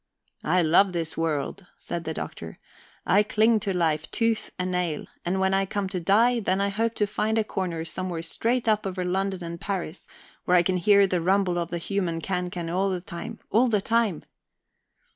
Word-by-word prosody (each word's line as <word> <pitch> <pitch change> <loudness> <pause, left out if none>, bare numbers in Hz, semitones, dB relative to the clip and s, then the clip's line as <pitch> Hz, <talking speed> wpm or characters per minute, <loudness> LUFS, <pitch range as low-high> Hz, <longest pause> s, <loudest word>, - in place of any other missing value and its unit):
"I 180 +3 +2
love 180 +4 +4
this 165 -2 -1
world," 165 +3 -2
said 170 -1 -5
the 160 - -2
Doctor. - - -6 0.5
"I 200 - +5
cling 215 +2 +3
to 205 -1 -2
life 160 -4 0
tooth 230 -1 0
and 180 0 -2
nail. 175 -4 -1 0.2
And 185 +2 -1
when 190 0 +2
I 195 0 +2
come 200 0 -2
to 185 - -3
die, 225 +7 +3
then 190 -3 0
I 200 0 +1
hope 225 +3 -1
to 210 - +2
find 215 +1 -1
a 220 - +3
corner 180 -6 -3
somewhere 175 0 -4
straight 235 +8 -1
up 215 -2 +2
over 185 -1 -3
London 190 0 -1
and 170 +1 -6
Paris, 190 -6 -4 0.4
where 180 - +4
I 175 - +5
can 185 +1 +1
hear 200 +2 +5
the 185 -2 0
rumble 185 0 +2
of 170 -1 -3
the 175 - -3
human 170 -1 -2
cancan 180 -1 -3
all 185 +4 0
the 185 -1 -1
time, 180 +6 -8
all 240 +4 +4
the 215 -3 +2
time." 225 -4 0
185 Hz, 200 wpm, -26 LUFS, 175-205 Hz, 0.5 s, I